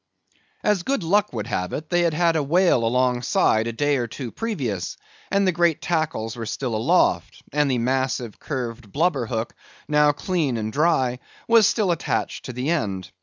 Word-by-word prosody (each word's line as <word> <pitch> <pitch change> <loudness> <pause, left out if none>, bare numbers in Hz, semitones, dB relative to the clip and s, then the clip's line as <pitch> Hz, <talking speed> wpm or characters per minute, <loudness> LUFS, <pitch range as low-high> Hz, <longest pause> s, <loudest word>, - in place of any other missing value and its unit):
As 210 -3 +2
good 265 +1 -1
luck 205 +5 +2
would 110 -4 -4
have 90 -5 -3
it, 155 +3 -5
they 175 0 +3
had 170 -3 +1
had 170 0 +2
a 160 - +2
whale 165 -3 +3
alongside 120 -2 +2
a - - -1
day 145 +4 +1
or 120 -2 -2
two 120 +1 -7
previous, 135 - -3 0.3
and 200 0 +2
the 185 - +3
great 170 -2 +2
tackles 155 -10 -2
were 115 -2 -5
still 125 0 -3
aloft, 110 - +1
and 150 -1 +2
the 130 - +1
massive 125 -2 -1
curved 120 -6 -5
blubber 145 - +1
hook, 115 0 -3 0.3
now 150 0 +4
clean 150 -5 -1
and 110 0 -3
dry, 135 -6 +2 0.3
was 230 -3 +6
still 210 -5 +1
attached 170 - -2
to 130 - -5
the 125 +6 -2
end. 100 - -2
140 Hz, 180 wpm, -23 LUFS, 115-170 Hz, 0.3 s, was